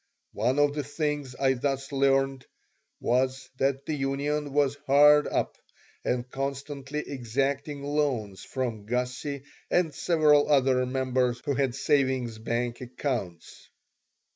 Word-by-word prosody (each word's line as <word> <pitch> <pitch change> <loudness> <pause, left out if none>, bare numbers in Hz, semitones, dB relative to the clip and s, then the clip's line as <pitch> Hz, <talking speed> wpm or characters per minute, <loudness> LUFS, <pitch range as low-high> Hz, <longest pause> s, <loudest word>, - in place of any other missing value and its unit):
One 120 +6 +1
of 145 0 +3
the 145 0 -2
things 145 -2 -3
I 135 0 +2
thus 135 +1 -2
learned 135 -1 +1 0.5
was 130 +1 0
that 135 0 0
the 155 - -2
union 145 +1 -1
was 145 -1 +2
hard 150 +2 +6
up - - -2 0.4
and 125 0 -1
constantly 140 +2 -4
exacting 140 +3 -2
loans 140 -9 -1
from 115 -6 -4
Gussie 125 +3 -2 0.3
and 170 -4 +2
several 150 -2 +3
other 130 -2 +3
members 130 -1 0
who 145 - +1
had 135 -2 0
savings 130 -4 +1
bank 120 +2 -2
accounts. 120 - -5
135 Hz, 120 wpm, -27 LUFS, 125-145 Hz, 0.5 s, hard